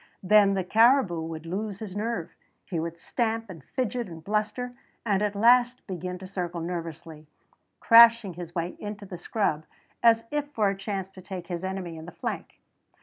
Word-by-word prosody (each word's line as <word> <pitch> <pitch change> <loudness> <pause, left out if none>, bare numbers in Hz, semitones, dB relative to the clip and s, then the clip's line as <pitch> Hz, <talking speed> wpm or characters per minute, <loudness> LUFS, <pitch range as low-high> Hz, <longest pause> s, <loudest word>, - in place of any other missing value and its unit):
Then 200 0 +5
the 190 - 0
caribou 225 -3 +4
would 160 0 -6
lose 200 +3 -3
his 205 -3 -7
nerve; 210 -5 -3 0.3
he 175 -4 -3
would 165 +1 -4
stamp 225 +3 -2
and 165 -6 -11
fidget 245 - -2
and 165 -1 -10
bluster, 215 +5 -2 0.3
and 200 -3 +2
at 210 -1 0
last 245 +3 +4
begin 180 -1 -5
to 190 - -10
circle 180 -2 -4
nervously, 165 -2 -6 0.5
crashing 230 -4 +7
his 175 0 -9
way 170 +1 -2
into 210 0 -6
the 180 -3 -8
scrub 175 -6 -1 0.4
as 230 -1 +5
if 295 -1 -2
for 210 -5 +2
a 195 - -1
chance 195 -1 -4
to 190 - -12
take 185 -2 -7
his 175 0 -4
enemy 190 -3 -4
in 160 +1 -9
the - - -8
flank. - - -6
195 Hz, 180 wpm, -27 LUFS, 175-225 Hz, 0.5 s, crashing